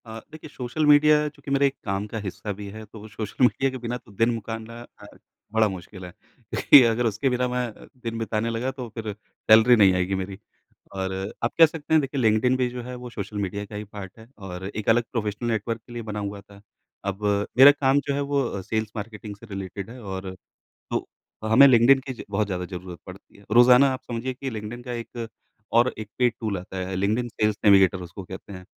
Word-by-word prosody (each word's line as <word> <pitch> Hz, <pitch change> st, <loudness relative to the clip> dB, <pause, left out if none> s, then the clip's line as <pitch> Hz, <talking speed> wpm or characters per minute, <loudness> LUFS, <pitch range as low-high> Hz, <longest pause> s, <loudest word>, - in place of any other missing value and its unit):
अ, 110 Hz, 0 st, -8 dB
देखिए 155 Hz, 0 st, -11 dB
social 135 Hz, +3 st, -2 dB
media 150 Hz, +1 st, +6 dB
चूँकि 145 Hz, -1 st, -10 dB
मेरा 140 Hz, 0 st, +3 dB
एक 140 Hz, -, +1 dB
काम 100 Hz, 0 st, -2 dB
का 110 Hz, -, -6 dB
हिस्सा 105 Hz, +1 st, -5 dB
भी 100 Hz, -, -6 dB
है, 110 Hz, +1 st, -9 dB
तो 110 Hz, 0 st, -12 dB
सोशल 110 Hz, +3 st, -3 dB
मीडिया 135 Hz, +2 st, +1 dB
के 130 Hz, -, -5 dB
बिना 120 Hz, 0 st, -4 dB
तो 115 Hz, -, -19 dB
दिन 115 Hz, +4 st, +2 dB
मुकारना 115 Hz, +1 st, -6 dB, 0.2 s
अ, -, -, -11 dB, 0.5 s
बड़ा 110 Hz, -1 st, +4 dB
मुश्किल 95 Hz, 0 st, -9 dB
है, 90 Hz, -, -9 dB, 0.4 s
क्योंकि 145 Hz, -, +7 dB
अगर 115 Hz, +1 st, +1 dB
उसके 110 Hz, +4 st, 0 dB
बिना 125 Hz, 0 st, 0 dB
मैं 125 Hz, 0 st, -1 dB
अ, -, -, -15 dB, 0.2 s
दिन 115 Hz, -1 st, -3 dB
बिताने 115 Hz, 0 st, -1 dB
लगा 115 Hz, +3 st, -2 dB
तो 130 Hz, -2 st, -7 dB
फिर 110 Hz, -2 st, -4 dB
सैलरी 110 Hz, +3 st, +4 dB
नहीं 100 Hz, -4 st, +6 dB
आएगी 90 Hz, +1 st, 0 dB
मेरी। 95 Hz, +1 st, -5 dB, 0.5 s
और 95 Hz, -1 st, -3 dB, 0.3 s
आप 115 Hz, -, +1 dB
कह 165 Hz, -, +11 dB
सकते 160 Hz, 0 st, -4 dB
हैं 160 Hz, -, +6 dB
देखिए 135 Hz, -1 st, -3 dB
लिंक्डइन 110 Hz, +3 st, +3 dB
भी 130 Hz, -1 st, +1 dB
जो 125 Hz, 0 st, -6 dB
है 125 Hz, +1 st, -7 dB
वो 125 Hz, -, -7 dB
सोशल 105 Hz, -2 st, -6 dB
मीडिया 100 Hz, +1 st, -3 dB
का 105 Hz, -, -11 dB
ही 105 Hz, -, -4 dB
पार्ट 100 Hz, -1 st, -10 dB
है 110 Hz, -, -14 dB, 0.2 s
और 90 Hz, 0 st, -7 dB
एक 105 Hz, +2 st, -4 dB
अलग 120 Hz, +2 st, +4 dB
प्रोफ़ेशनल 110 Hz, 0 st, -2 dB
नेटवर्क 115 Hz, +1 st, -2 dB
के 120 Hz, -, -11 dB
लिए 120 Hz, -, -5 dB
बना 105 Hz, -1 st, -5 dB
हुआ 100 Hz, 0 st, -5 dB
था। 100 Hz, 0 st, -17 dB, 0.4 s
अब 100 Hz, +1 st, -4 dB, 0.3 s
मेरा 135 Hz, +2 st, +10 dB
काम 140 Hz, -1 st, +2 dB
जो 140 Hz, -, +1 dB
है 140 Hz, -, -1 dB
वो 130 Hz, -8 st, 0 dB
सेल्स 110 Hz, +2 st, -3 dB
मार्केटिंग 105 Hz, -1 st, -7 dB
से 105 Hz, -, -15 dB
रिलेटेड 95 Hz, 0 st, -6 dB
है 125 Hz, +1 st, -10 dB
और 95 Hz, -1 st, -6 dB, 0.6 s
तो -, -, -2 dB, 0.4 s
हमें 130 Hz, +6 st, +8 dB
लिंक्डइन 130 Hz, +1 st, +6 dB
की 130 Hz, -, -3 dB
ज 120 Hz, -, -9 dB
बहुत 105 Hz, +1 st, 0 dB
ज़्यादा 90 Hz, -2 st, -3 dB
ज़रूरत 90 Hz, -1 st, -8 dB
पड़ती 90 Hz, +1 st, -13 dB
है। 100 Hz, -, -19 dB
रोजाना 125 Hz, +4 st, +7 dB
आप 130 Hz, -, -6 dB
समझिए 120 Hz, +3 st, -3 dB
कि 135 Hz, +2 st, -5 dB
लिंक्डइन 110 Hz, +1 st, -6 dB
का 125 Hz, -, -6 dB
एक 115 Hz, 0 st, -6 dB, 0.5 s
और 120 Hz, +2 st, +4 dB
एक 110 Hz, -1 st, -7 dB
पेड 125 Hz, -2 st, +3 dB
टूल 110 Hz, -4 st, -2 dB
आता 95 Hz, +1 st, -8 dB
है, 95 Hz, -, -4 dB
लिंक्डइन 110 Hz, +6 st, 0 dB
सेल्स 105 Hz, -2 st, 0 dB
नेविगेटर 95 Hz, -2 st, +5 dB
उसको 90 Hz, +2 st, -9 dB
कहते 95 Hz, +2 st, -10 dB
हैं, 90 Hz, -1 st, -9 dB
110 Hz, 225 wpm, -25 LUFS, 100-125 Hz, 0.6 s, कह